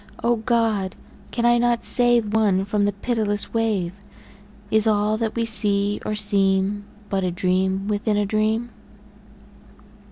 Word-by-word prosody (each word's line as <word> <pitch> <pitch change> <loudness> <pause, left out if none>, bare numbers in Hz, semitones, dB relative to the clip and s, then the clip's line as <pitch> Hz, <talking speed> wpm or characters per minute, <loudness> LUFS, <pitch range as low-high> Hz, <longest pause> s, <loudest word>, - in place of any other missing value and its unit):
O 240 0 +2
God! 220 -4 0 0.3
can 235 -1 -2
I 240 0 +4
not 240 -1 +1
save 240 -3 +3
One 200 -4 +2
from 205 0 0
the 205 - +1
pitiless 205 0 -2
wave? 205 -5 -1 0.7
Is 220 0 +2
all 210 0 +1
that 225 -1 -3
we 230 -1 0
see 205 -2 +2
or 215 - -3
seem 200 -1 +2 0.2
But 195 -1 -1
a 185 - 0
dream 190 +2 -1
within 210 0 -1
a 205 - +1
dream? 220 +3 -1
210 Hz, 140 wpm, -22 LUFS, 200-225 Hz, 0.7 s, I